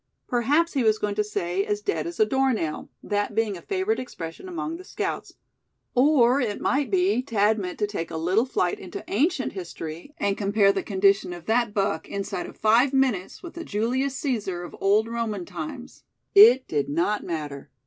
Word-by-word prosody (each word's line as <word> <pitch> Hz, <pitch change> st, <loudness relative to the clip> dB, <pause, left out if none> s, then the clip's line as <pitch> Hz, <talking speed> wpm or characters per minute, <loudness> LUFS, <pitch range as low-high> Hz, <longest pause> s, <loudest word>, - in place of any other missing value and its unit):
Perhaps 285 Hz, +8 st, +1 dB
he 275 Hz, -, +1 dB
was 220 Hz, -1 st, +3 dB
going 210 Hz, -1 st, -1 dB
to 210 Hz, +1 st, +1 dB
say 190 Hz, -2 st, -2 dB
"as 205 Hz, 0 st, -1 dB
dead 165 Hz, -6 st, -2 dB
as 170 Hz, -, -7 dB
a 215 Hz, -, +6 dB
door 265 Hz, +3 st, +2 dB
nail," 160 Hz, -8 st, -3 dB
that 205 Hz, 0 st, -1 dB
being 220 Hz, -3 st, +1 dB
a 175 Hz, -, -9 dB
favorite 395 Hz, +3 st, -1 dB
expression 175 Hz, -, -7 dB
among 335 Hz, -2 st, -4 dB
the 365 Hz, -, -11 dB
scouts; -, -, -4 dB, 0.6 s
or 260 Hz, -1 st, +4 dB
it 215 Hz, -4 st, -2 dB
might 280 Hz, 0 st, 0 dB
be 370 Hz, -6 st, +2 dB
Thad 220 Hz, -3 st, +1 dB
meant 180 Hz, -2 st, -5 dB
to 210 Hz, -, +1 dB
take 200 Hz, -5 st, -4 dB
a 165 Hz, -, -5 dB
little 185 Hz, +9 st, +1 dB
flight 180 Hz, -8 st, 0 dB
into 185 Hz, -, -8 dB
ancient 270 Hz, -, 0 dB
history, 170 Hz, -, -7 dB
and 200 Hz, -1 st, 0 dB
compare 200 Hz, 0 st, +3 dB
the -, -, -2 dB
condition 195 Hz, -2 st, +2 dB
of 175 Hz, -1 st, -10 dB
that 230 Hz, -1 st, +1 dB
buck 195 Hz, -6 st, -1 dB
inside 195 Hz, -2 st, -4 dB
of -, -, -12 dB
five 235 Hz, +5 st, +4 dB
minutes 255 Hz, -, 0 dB
with 345 Hz, -, -8 dB
the 340 Hz, -, -6 dB
Julius 255 Hz, +3 st, -1 dB
Caesar 205 Hz, -10 st, -2 dB
of 175 Hz, -, -9 dB
olden 215 Hz, +4 st, +2 dB
Roman 215 Hz, -6 st, -2 dB
times. 180 Hz, +7 st, -8 dB, 0.3 s
It 395 Hz, -, +8 dB
did 145 Hz, -2 st, -1 dB
not 175 Hz, +8 st, 0 dB
matter. 150 Hz, -4 st, -5 dB
210 Hz, 190 wpm, -25 LUFS, 185-260 Hz, 0.6 s, It